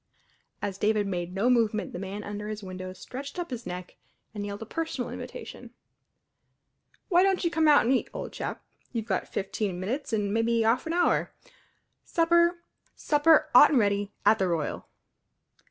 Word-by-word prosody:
As 195 -1 -3
David 210 -1 +2
made 180 -2 -3
no 195 +5 0
movement 225 -4 +1
the - - -5
man 195 +2 -5
under 205 0 -6
his 215 -1 -5
window 185 0 -6
stretched 265 - -8
up 350 -5 -4
his 240 -2 -5
neck 180 0 -7 0.4
and 205 -2 -5
yelled 205 +1 -5
a - - -9
personal 305 -1 -3
invitation, - - -9 1.4
"W'y 350 0 +6
don't 385 0 +2
you 340 - +1
come 320 -2 +2
out 290 -6 +6
and 250 - +3
eat, 260 - 0
old - - -6
chap? - - -5 0.3
You've 230 -3 -3
got 195 -5 -1
fifteen 195 -1 -3
minutes 245 +11 -3
an' 205 -2 0
mebby 225 0 +2
'arf 235 +7 +2
an 325 - -1
'our; 350 0 +1 0.7
supper 340 +1 +2 0.3
supper 305 +1 +3
'ot 250 +4 +9
an' 290 - +2
ready 205 -2 +1
at 215 +2 +5
the 190 - +2
Royal!" 165 -4 -2
220 Hz, 170 wpm, -27 LUFS, 200-290 Hz, 1.4 s, ot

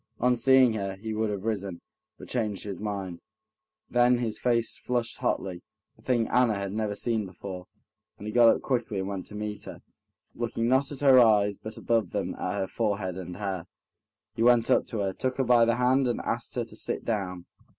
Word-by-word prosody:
On 125 +1 +3
seeing 130 0 +5
her, 100 -3 -3
he 110 +3 -5
would 110 0 0
have 100 -2 -4
risen, 100 -5 -3 0.4
but - - -11
changed 110 -5 -2
his 100 -3 -6
mind, 100 -5 -4 0.7
then 120 0 +4
his 115 -3 -2
face 115 -2 +1
flushed 120 -2 -2
hotly—a 90 -2 -5
thing 120 -3 +1
Anna 125 -4 +3
had 100 -1 -3
never 105 -1 -2
seen 110 -2 -1
before, 90 0 -8 0.5
and 105 - -10
he 105 - -4
got 120 -1 +6
up - - +2
quickly 120 -6 -1
and 95 0 -2
went 100 -2 -5
to 105 - -9
meet 105 0 -5
her, - - -10 0.5
looking 115 0 -2
not 130 +3 +2
at 145 - -6
her 135 -2 +7
eyes, 105 -3 +4
but 110 +2 -9
above 115 -2 0
them - - -2
at - - -3
her - - -1
forehead 100 -5 -2
and 90 -1 -7
hair. 95 -4 -4 0.7
He 110 - -5
went 120 -1 +4
up - - +3
to 110 - -3
her, 95 -1 -1
took 130 +5 -2
her 135 - +2
by 120 -2 +5
the 115 0 +2
hand, 125 +2 +3
and 120 - -1
asked - - -3
her - - 0
to - - -11
sit - - -4
down. 90 -6 -3
110 Hz, 205 wpm, -27 LUFS, 100-120 Hz, 0.7 s, her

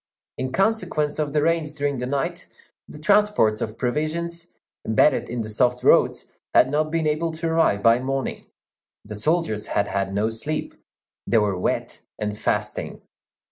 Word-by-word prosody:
In 130 0 -2
consequence 175 -6 0
of 150 -2 -1
the 150 0 +1
rains 160 -2 0
during 145 -2 -1
the 125 - -3
night, 140 0 -2 0.4
the - - -11
transports 200 - +3
of 110 +1 -4
provisions, 165 +7 -3 0.3
embedded 110 +7 +2
in 120 0 -3
the 110 - -5
soft 125 +3 +1
roads, - - +3 0.2
had 130 - +5
not 155 +1 +1
been 165 0 -1
able 155 +2 0
to 165 +1 -3
arrive 160 -11 +2
by 115 +1 +5
morning; 135 +1 -3 0.6
the 105 - -7
soldiers 130 -2 0
had 100 - 0
had 100 0 -1
no 105 +3 0
sleep; 150 +8 -4 0.5
they 115 - +3
were 105 -3 +2
wet 90 - -2 0.2
and 105 -1 -3
fasting. - - -2
145 Hz, 160 wpm, -23 LUFS, 110-160 Hz, 0.6 s, had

